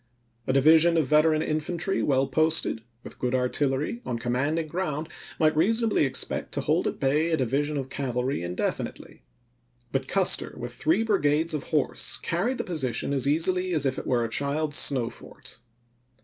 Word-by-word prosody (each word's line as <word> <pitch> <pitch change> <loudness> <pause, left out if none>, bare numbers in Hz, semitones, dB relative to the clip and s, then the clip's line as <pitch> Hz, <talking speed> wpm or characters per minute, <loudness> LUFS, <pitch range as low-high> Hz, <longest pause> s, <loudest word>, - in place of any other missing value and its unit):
A 130 - +1
division 160 +5 +5
of 160 - +3
veteran 155 +2 +3
infantry 170 +5 -2
well 135 -1 +2
posted, 155 -3 +2 0.2
with - - -11
good 125 0 0
artillery, 135 - -1
on 120 - -3
commanding 130 +7 -1
ground, 155 -2 -3 0.3
might 155 -1 +3
reasonably 220 +2 +2
expect 135 - -2
to - - -1
hold - - +1
at - - -4
bay 150 +5 +1
a 160 - +1
division 145 +4 0
of 135 -1 -4
cavalry 130 -2 -2
indefinitely. 90 +1 -4 0.7
But - - -1
Custer - - +2
with 120 0 -6
three 165 - +1
brigades 165 -6 +1
of 150 - -3
horse 150 -3 0
carried 225 +10 -1
the - - -2
position 140 -5 -2
as 135 -1 0
easily 180 +4 +1
as 145 -2 0
if 130 -1 0
it - - -8
were 120 -2 +1
a - - -4
child's 145 +3 -1
snow 125 -4 +2
fort. 130 -4 -10
150 Hz, 165 wpm, -26 LUFS, 130-165 Hz, 0.7 s, division